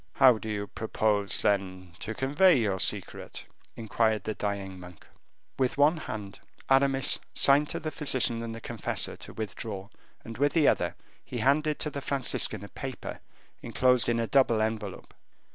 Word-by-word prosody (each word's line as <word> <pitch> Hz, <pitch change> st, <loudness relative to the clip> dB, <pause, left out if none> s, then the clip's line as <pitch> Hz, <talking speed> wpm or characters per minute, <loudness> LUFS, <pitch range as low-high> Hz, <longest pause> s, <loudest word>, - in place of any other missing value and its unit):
"How 125 Hz, -4 st, +6 dB
do 110 Hz, -, -6 dB
you 105 Hz, -1 st, -2 dB
propose, 105 Hz, -1 st, 0 dB
then, 95 Hz, -3 st, -1 dB
to 110 Hz, +1 st, -5 dB
convey 145 Hz, +7 st, +4 dB
your 100 Hz, -5 st, 0 dB
secret?" -, -, -1 dB, 0.3 s
inquired 110 Hz, -1 st, 0 dB
the 110 Hz, -, -3 dB
dying 100 Hz, -3 st, -4 dB
monk. 90 Hz, -3 st, -13 dB, 0.5 s
With 130 Hz, 0 st, 0 dB
one 150 Hz, +4 st, +4 dB
hand 105 Hz, -9 st, -7 dB, 0.3 s
Aramis 135 Hz, -1 st, +4 dB, 0.2 s
signed 145 Hz, +2 st, +5 dB
to -, -, -3 dB
the 155 Hz, 0 st, -4 dB
physician 130 Hz, -6 st, 0 dB
and 115 Hz, -1 st, -5 dB
the 115 Hz, -, -9 dB
confessor 115 Hz, -1 st, -3 dB
to -, -, -8 dB
withdraw, 100 Hz, -2 st, -6 dB, 0.4 s
and 115 Hz, 0 st, -8 dB
with 145 Hz, +1 st, +2 dB
the 160 Hz, -4 st, +4 dB
other -, -, +1 dB, 0.3 s
he -, -, -7 dB
handed 150 Hz, +2 st, +2 dB
to 150 Hz, -, -1 dB
the 140 Hz, -, -5 dB
Franciscan 130 Hz, -7 st, 0 dB
a 100 Hz, -, -9 dB
paper 135 Hz, -2 st, -7 dB, 0.4 s
enclosed 125 Hz, -2 st, +2 dB
in 115 Hz, 0 st, +1 dB
a 115 Hz, -, 0 dB
double 120 Hz, -3 st, +3 dB
envelope. 110 Hz, -3 st, -3 dB
115 Hz, 160 wpm, -28 LUFS, 105-135 Hz, 0.5 s, How